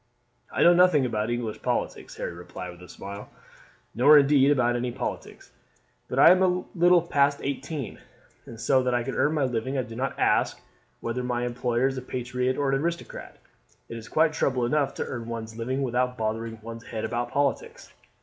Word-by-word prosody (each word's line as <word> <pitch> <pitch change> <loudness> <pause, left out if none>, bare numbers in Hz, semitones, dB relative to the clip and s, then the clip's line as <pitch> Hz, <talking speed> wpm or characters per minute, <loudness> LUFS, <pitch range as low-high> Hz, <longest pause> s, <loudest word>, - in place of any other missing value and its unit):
"I - - +1
know 175 - +7
nothing 175 -6 +4
about 110 -2 -1
English 120 -3 -3
politics," - - -3
Harry - - -5
replied 90 +1 -8
with 90 0 -15
a 90 - -13
smile; 100 +1 -9 0.6
"nor 145 +6 +7
indeed 140 -1 +5
about 125 -4 +2
any 120 0 -2
politics. - - -6 0.6
I - - +7
am 185 - +5
but 180 0 0
little 175 0 +5
past 140 -3 +2
eighteen, 140 0 -4 0.5
and 115 - -10
so 130 +3 +3
that 125 -1 0
I 120 - 0
can 135 +2 -4
earn 150 - +1
my 150 - +1
living 130 +1 -2
I 130 - 0
do 115 -1 -10
not 130 +3 -3
ask - - +1 0.4
whether 115 +2 -3
my 120 -1 -1
employer 120 0 0
is 135 -1 0
a - - -9
patriot 125 0 -2
or 140 -2 +1
an 135 0 +1
aristocrat. 170 +1 -5 0.5
It - - -6
is 110 - -10
quite 155 0 +3
trouble 130 -5 0
enough 140 +2 0
to - - -3
earn 120 -3 -6
one's 110 -1 -6
living 130 +4 -2
without 125 0 0
bothering 115 +1 -3
one's 115 0 -8
head 110 - -4
about 120 0 -2
politics. 140 +1 -2
125 Hz, 190 wpm, -26 LUFS, 115-140 Hz, 0.6 s, know